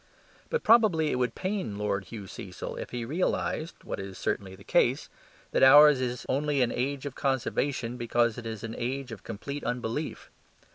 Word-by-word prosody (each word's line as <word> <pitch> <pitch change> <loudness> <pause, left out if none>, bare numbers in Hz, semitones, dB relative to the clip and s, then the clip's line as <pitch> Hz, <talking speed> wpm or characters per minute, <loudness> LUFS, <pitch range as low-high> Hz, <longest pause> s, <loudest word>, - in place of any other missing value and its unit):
But 475 - -1
probably 205 -10 +5
it 125 - -1
would 125 -2 0
pain 185 - -3
Lord 100 -1 -1
Hugh 105 +1 -8
Cecil - - -7
if - - -6
he 120 -1 -4
realized 160 +2 -2
(what - - -5
is 95 -1 -7
certainly 95 -1 -2
the 100 - -15
case) - - +2 0.4
that - - +1
ours 145 0 +8
is 125 -1 -3
only 140 0 +1
an 120 - 0
age 135 +2 -2
of 140 - -4
conservation 130 -2 -1
because 120 -1 +1
it 115 - -7
is 110 -1 -6
an 115 -1 -5
age 130 +1 -3
of 110 -3 -8
complete 140 +6 -6
unbelief. 125 +4 -3
125 Hz, 180 wpm, -28 LUFS, 115-145 Hz, 0.4 s, ours